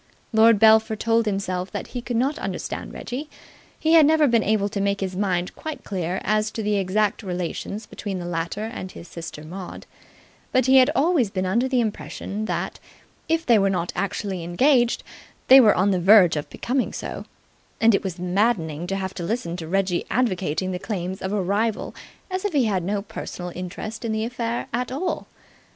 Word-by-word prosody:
Lord 225 0 +6
Belpher 220 +1 +5
told 225 +1 +1
himself 190 -2 -2
that - - -5
he 245 - -5
could 240 -1 -3
not 275 +6 0
understand - - -4
Reggie. 280 +5 -6 0.5
He 320 - +1
had 325 -2 +8
never 310 +1 +5
been 235 -3 +3
able 210 -1 +1
to 205 -1 -3
make 200 0 0
his 190 -1 -3
mind 180 -2 -1
quite 315 -1 -6
clear 185 -2 -2
as 215 +1 +1
to 220 - -3
the 210 0 +1
exact 200 +2 0
relations 185 +3 -4
between 200 -2 -5
the 175 - -5
latter 170 +4 -3
and 220 -4 -6
his 170 - -11
sister 165 -3 -8
Maud, 180 +3 -8 0.7
but 255 -1 +3
he 265 +1 +6
had 255 -1 +6
always 295 - +3
been 190 -1 -2
under 230 +8 +1
the 260 -1 +1
impression 215 -1 -4
that, - - -3 0.5
if 325 0 +1
they 230 -3 +5
were 195 0 +3
not 175 -2 -2
actually 195 -1 -2
engaged, 240 - +2 0.5
they 265 +1 +10
were 215 -4 +5
on 195 +2 +3
the 185 - +1
verge 190 -3 +7
of 150 - -4
becoming 255 +1 -1
so; - - -6 0.5
and 225 0 +5
it 195 - +1
was 190 -3 -4
maddening 180 -3 0
to 195 - -2
have 190 -1 -3
to 175 - -6
listen 175 -3 -2
to 165 -2 -6
Reggie 185 0 0
advocating 185 -7 0
the 180 - -3
claims 190 -2 -4
of 190 - -3
a 210 - 0
rival 205 +4 -1 0.4
as 370 0 -2
if 410 -4 -1
he 275 -5 +3
had 195 -5 0
no 200 +2 -1
personal 180 -3 -7
interest 185 +5 -6
in 230 - -2
the 220 0 -1
affair 235 0 -3
at 250 +2 -2
all. 325 +8 -3
205 Hz, 195 wpm, -23 LUFS, 185-235 Hz, 0.7 s, they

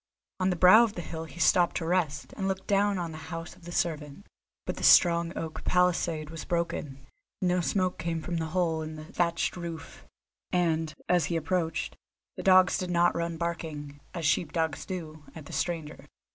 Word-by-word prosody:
On 185 0 +2
the 180 - +1
brow 185 +6 +8
of 220 -4 -2
a - - -2
hill 160 0 -6
he 165 - -12
stopped 175 -1 +4
to 165 - -3
rest, 165 -4 -1
and 195 - -2
looked 190 0 -2
down 200 0 +2
on 170 -2 -3
the 155 - -8
house 165 0 -6
of 180 -2 -18
the 175 - -7
servant. 155 0 -2 0.4
But - - -4
the - - -6
strong 170 -1 +6
oak 160 -1 -5
palisade 170 -4 +1
was 165 -1 -6
broken, 170 -5 -2 0.4
no 180 -1 +1
smoke 185 +1 0
came 165 -1 -2
from 170 +2 -3
the 160 -1 -2
hole 165 -1 0
in 155 0 -6
the 155 0 -9
thatched 170 -1 0
roof, 170 -3 -7 0.5
and, 165 -3 +1 0.2
as 175 -3 +3
he 170 - -2
approached, 165 0 -1 0.4
the - - -6
dogs 185 -1 +5
did 185 - -3
not 175 0 +3
run 170 0 -2
barking, 155 -4 -4 0.2
as 170 -2 -3
sheep 150 +1 +2
dogs 160 -3 -2
do, 155 -5 -6
at 160 -3 -9
the - - -10
stranger. 160 -4 -3
170 Hz, 195 wpm, -28 LUFS, 160-180 Hz, 0.5 s, brow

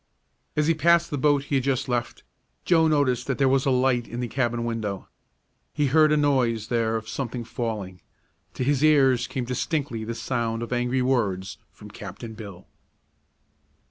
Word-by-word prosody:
As 150 - +2
he 165 - +3
passed 170 +2 +3
the 145 - -1
boat 145 0 +3
he 145 - -7
had 130 - -1
just 135 0 0
left, 120 -2 -3 0.4
Joe 165 -2 +4
noticed 135 -5 +1
that 135 - -1
there 135 - +3
was 135 +1 +2
a - - +4
light 125 -2 +2
in 120 - -6
the 125 - -2
cabin 120 -2 -1
window. 110 -4 -3 0.7
He 150 - +1
heard 155 +3 +4
a 150 - +3
noise 125 -7 +1
there 115 -2 +1
as 110 - -5
of - - -19
something 125 -2 -4
falling. 105 -7 -5 0.5
To - - -2
his 140 +2 +1
ears 135 -5 +4
came 130 -2 -3
distinctly 130 -1 -2
the 115 +1 -4
sound 115 -2 -2
of 120 - -4
angry 125 +1 0
words 100 -8 -1
from - - -13
Captain 115 -2 -8
Bill. 100 -5 -10
125 Hz, 180 wpm, -25 LUFS, 115-140 Hz, 0.7 s, Joe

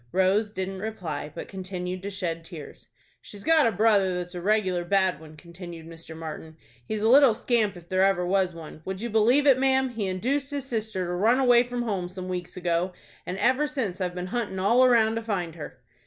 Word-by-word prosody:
Rose 190 +3 +2
didn't 190 -1 -4
reply, 180 -8 -5
but - - -6
continued 185 -1 -5
to 200 - -5
shed 175 -4 -4
tears. 165 -4 -11 0.3
"She's 200 -1 -11
got 320 -5 +4
a - - +2
brother 200 -3 +3
that's 180 0 -5
a 175 - -5
regular 190 -3 +1
bad 190 -2 +1
one," 155 -1 -13
continued 170 0 -10
Mr. 165 -1 -11
Martin. 160 0 -8 0.3
"He's 215 - -3
a - - +3
little 260 -1 +6
scamp, 220 -5 0
if 170 -1 -14
there 185 +1 +1
ever 195 -2 +2
was 185 -1 +1
one. 160 -1 -10
Would 190 +2 -5
you 235 +1 -4
believe 235 +7 +4
it, 270 -3 +5
ma'am, 265 0 +2
he 225 -5 -3
induced 260 +10 -1
his 285 -2 -4
sister 220 -7 -3
to 175 - -3
run 220 +8 +3
away 245 -2 +6
from 245 0 -3
home 195 -6 -2
some 185 0 -7
weeks 180 -1 -5
ago, 175 +1 -1 0.3
and 180 - -3
ever 260 +7 +2
since 230 -11 -3
I've 180 -1 -2
been 180 0 -4
hunting 230 -6 -2
all 230 +7 +4
around 225 -3 +4
to - - -2
find 190 -7 -3
her?" 155 -2 -9
190 Hz, 215 wpm, -26 LUFS, 180-230 Hz, 0.3 s, little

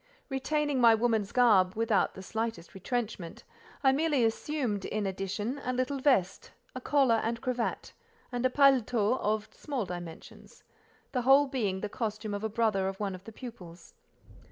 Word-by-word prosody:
Retaining 285 0 0
my 230 -1 +7
woman's 220 -3 0
garb 205 -7 +4
without 225 -2 +1
the 190 - -9
slightest 225 -2 -4
retrenchment, 200 -4 -4 0.4
I 265 - +6
merely 285 -3 +2
assumed, 225 -3 -1
in 215 -1 -2
addition, 195 +7 -3
a 255 - -1
little 255 +2 -1
vest, 205 -10 +1 0.2
a 255 - -6
collar, 260 -5 +3
and 230 +1 -2
cravat, 250 -2 -3 0.4
and 245 0 -2
a 255 - +4
paletôt 250 -4 +3
of 215 +1 -1
small 275 -8 -4
dimensions; 175 -2 -10 0.5
the 250 - 0
whole 270 +3 +6
being 210 -9 -2
the 210 - -2
costume 215 -1 -4
of 205 +1 -4
a 220 - -1
brother 215 -4 +1
of 195 0 -5
one 200 -2 -2
of 185 +1 -10
the 225 - -9
pupils. 185 -8 -11
225 Hz, 160 wpm, -30 LUFS, 200-255 Hz, 0.5 s, my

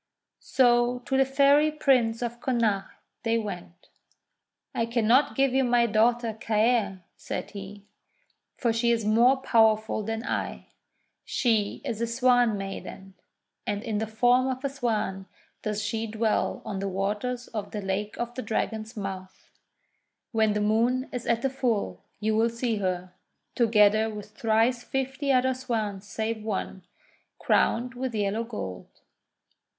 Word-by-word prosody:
So 240 -1 +3
to 265 - -1
the 270 0 +4
Fairy 280 +3 +4
Prince 250 -6 +2
of 240 0 -4
Connacht 230 -7 0 0.3
they 230 0 +1
went. 180 -5 -7 0.8
'I 230 - 0
cannot 235 +4 +3
give 270 -2 +2
you 265 0 +3
my 240 -1 +3
daughter 230 +1 +2
Caer," 215 -4 +1
said - - -5
he, 200 0 -9 0.7
:'for 235 -3 +1
she 235 +1 +1
is 230 -2 +1
more 235 +5 +5
powerful 220 -4 +2
than 225 +2 -4
I. - - -3 0.5
She 220 -5 0
is 225 0 -3
a 235 - +1
Swan 245 -2 +3
Maiden, 195 0 -7 0.5
and 205 0 -2
in 220 -3 -2
the 220 - -2
form 245 +4 +3
of 260 0 -3
a - - +1
Swan 215 -7 -2 0.3
does 210 0 -2
she 225 +1 -2
dwell 220 0 -1
on 195 - -4
the 195 0 -2
waters 210 +6 -2
of 210 -3 -5
the 210 - -5
Lake 195 +2 -3
of 240 0 -3
the 255 - -4
Dragon's 220 +1 -3
Mouth. 190 -2 -7 0.8
When 220 -2 +2
the 210 - -1
Moon 235 +5 +1
is 250 -1 -5
at 235 0 +1
the 270 - +2
full 225 - -1 0.2
you 215 0 0
will 225 +1 +3
see 235 -1 -2
her, 185 -2 -2 0.4
together 215 -2 +4
with 210 0 -8
thrice 225 +3 +1
fifty 270 +1 -2
other 260 0 +3
Swans 215 -6 -3
save 220 +2 -3
one, 190 -3 -4 0.5
crowned 245 +2 +1
with 250 -1 -4
yellow 210 +2 0
gold." 150 - -6
225 Hz, 145 wpm, -27 LUFS, 210-245 Hz, 0.8 s, more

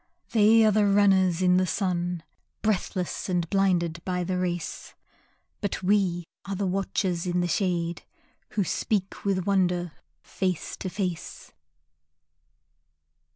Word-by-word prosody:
They 220 0 +6
are 215 - +5
the 210 0 +3
runners 190 -3 +4
in 180 0 +5
the 185 0 +2
sun, 175 -3 -1 0.4
Breathless 190 -3 -1
and 175 -2 0
blinded 175 -4 +1
by 180 -1 -1
the 180 +1 -1
race, 175 -2 -4 0.7
But 205 -3 -3
we 185 -3 +2 0.2
are 195 - -4
watchers 190 -2 -1
in 180 0 +1
the 175 - 0
shade 170 -1 -1 0.5
Who 210 - +1
speak 195 +2 -2
with 190 -3 0
Wonder 180 -3 +1 0.3
face 185 -4 -2
to 190 - -4
face. 180 -3 -5
185 Hz, 120 wpm, -26 LUFS, 175-195 Hz, 0.7 s, They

